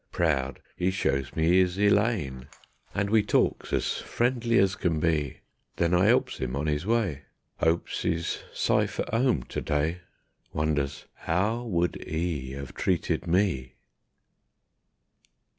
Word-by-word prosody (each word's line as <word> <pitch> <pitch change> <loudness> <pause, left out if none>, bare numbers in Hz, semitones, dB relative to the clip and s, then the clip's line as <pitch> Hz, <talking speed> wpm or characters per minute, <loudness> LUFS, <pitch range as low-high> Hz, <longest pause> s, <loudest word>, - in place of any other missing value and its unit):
Proud 70 -6 0 0.2
'e 90 - +2
shows 70 -8 -1
me 85 +3 +4
'is 90 0 +2
Elaine, 100 - +1 0.5
And 100 0 0
we 110 -1 +5
talks 105 - +1
as - - 0
friendly 120 -1 0
as 95 -3 +4
can 85 -4 0
be; 75 -4 0 0.3
Then 85 0 +1
I 90 +3 +4
'elps 125 - +2
'im 65 0 -2
on 75 +3 -2
'is 75 +4 -1
way, 100 -12 0 0.4
'Opes 80 +1 0
'e's 85 0 -1
sife - - +1
at - - -3
'ome 115 - +2
to - - -5
day, 80 +4 0 0.5
Wonders 75 -2 -1 0.2
_'OW 110 +8 0
WOULD 90 -4 0
'E 80 -5 -3
'AVE 70 -1 -7
TREATED 90 -4 0
ME? 85 -9 +1
85 Hz, 135 wpm, -27 LUFS, 75-100 Hz, 0.5 s, we